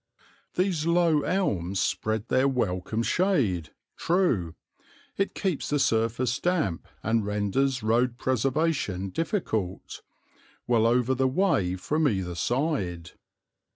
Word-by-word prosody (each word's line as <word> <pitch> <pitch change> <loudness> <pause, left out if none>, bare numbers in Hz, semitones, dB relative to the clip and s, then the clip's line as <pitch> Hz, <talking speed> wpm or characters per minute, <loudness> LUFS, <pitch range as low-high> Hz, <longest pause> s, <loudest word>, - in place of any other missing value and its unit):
These 180 -4 0
low 170 -3 +3
elms 100 - -1
spread 110 +3 -1
their 130 +1 +3
welcome 110 -3 -1
shade 120 - +1 0.3
true, 130 - +1 0.6
it 195 - -1
keeps 185 -8 -2
the 145 - +1
surface 120 -1 +1
damp 165 - -1 0.2
and 110 0 +1
renders 105 +6 0
road 120 +2 +1
preservation 130 - 0
difficult 110 - -3 0.6
well 115 -2 +3
over 125 +2 +2
the 130 +1 +1
way 130 - +1
from 150 - 0
either 95 -7 -1
side. 95 - -1
120 Hz, 110 wpm, -27 LUFS, 100-155 Hz, 0.6 s, low